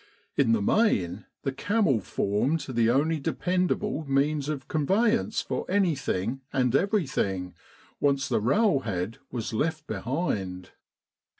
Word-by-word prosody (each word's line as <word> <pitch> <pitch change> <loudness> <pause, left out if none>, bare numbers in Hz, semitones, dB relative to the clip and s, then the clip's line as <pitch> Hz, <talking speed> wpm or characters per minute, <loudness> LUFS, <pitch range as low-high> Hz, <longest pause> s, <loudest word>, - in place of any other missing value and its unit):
In 135 -5 +3
the 105 -3 +1
main, 100 - +1 0.2
the 135 - 0
camel 180 - +1
formed 105 - 0
the 115 -4 +1
only 150 +6 +2
dependable 180 +3 0
means 145 +1 +1
of 140 -4 -4
con 150 -3 -1
veyance 220 +2 +2
for - - -2
anything 135 - 0
and 125 -2 +1
everything, 140 - 0 0.5
once 140 -2 +2
the - - +1
rail 175 - +3
head 100 -2 -3
was 115 -3 -4
left 155 +6 -1
behind. 100 - -3
140 Hz, 125 wpm, -27 LUFS, 110-165 Hz, 0.5 s, In